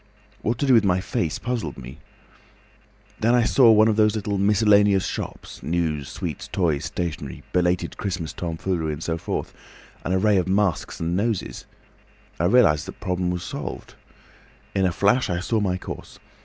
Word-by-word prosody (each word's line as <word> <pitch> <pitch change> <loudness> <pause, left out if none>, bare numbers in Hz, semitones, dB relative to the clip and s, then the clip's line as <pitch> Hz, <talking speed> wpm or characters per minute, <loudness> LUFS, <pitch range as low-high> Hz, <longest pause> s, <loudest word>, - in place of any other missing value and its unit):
What 115 +2 -1
to 140 - -1
do 135 - +4
with 115 -3 +6
my 90 -2 +2
face 85 -3 -2
puzzled 120 - -3
me. 65 0 -10 1.2
Then 115 +3 +3
I 120 - +4
saw 125 +1 +5
in 110 - +6
one 110 +1 +6
of 110 -1 +1
those 105 0 +4
little 100 -2 -2
miscellaneous 100 -1 +4
shops—news, 80 -5 -3
sweets, 85 -4 -5
toys, 80 -7 0
stationery, 75 -6 -4
belated 90 -1 0
Christmas 90 -5 -3
tomfoolery, 85 -1 -2
and 75 +2 -6
so 85 0 -2
forth—an 85 - -7
array 100 +2 +3
of 90 -1 +1
masks 95 -3 0
and 85 +1 -1
noses. 105 0 -2 0.7
I 85 - +1
realised 90 -8 +4
that 95 - -9
problem 90 -2 -1
was 90 -1 -3
solved. - - -6 0.8
In 95 -1 +2
a - - 0
flash 105 +9 +2
I 85 -1 0
saw 110 +5 0
my 95 -3 0
course. - - -8
95 Hz, 165 wpm, -23 LUFS, 85-105 Hz, 1.2 s, with